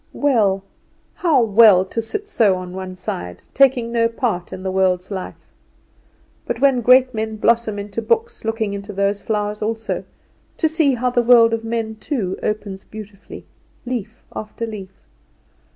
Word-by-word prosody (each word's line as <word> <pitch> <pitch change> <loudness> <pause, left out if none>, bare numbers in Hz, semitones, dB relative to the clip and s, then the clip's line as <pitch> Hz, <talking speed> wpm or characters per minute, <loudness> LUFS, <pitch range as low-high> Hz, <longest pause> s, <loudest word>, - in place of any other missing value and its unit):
Well, 210 -9 +2 0.5
how 305 -8 +2
well, 210 -4 +6
to 230 +4 -3
sit 405 - -4
so 215 - +3
on 180 0 -7
one 185 0 -6
side 90 - -6
taking 255 -4 +3
no 230 -1 +2
part 230 -6 -3
in 185 - -7
the 190 - -2
world's 185 0 +1
life; 190 -2 -7 1.0
but 240 - -2
when 270 -2 +3
great 255 +2 +5
men 220 0 -3
blossom 225 -1 +1
into 205 +2 -4
books 450 - -1
looking 225 -2 -2
into 200 +1 -6
those 200 +1 0
flowers 210 -1 -2
also, 225 +1 -3 0.5
to 320 - +2
see 310 -4 +2
how 250 +1 0
the 240 - +2
world 230 -1 +6
of 225 0 -2
men 225 -1 -3
too 215 -5 -3
opens 205 -2 -3
beautifully, 210 -2 -11 0.4
leaf 240 -2 -5
after 215 +2 -5
leaf. 210 -4 -7
220 Hz, 155 wpm, -20 LUFS, 200-240 Hz, 1.0 s, well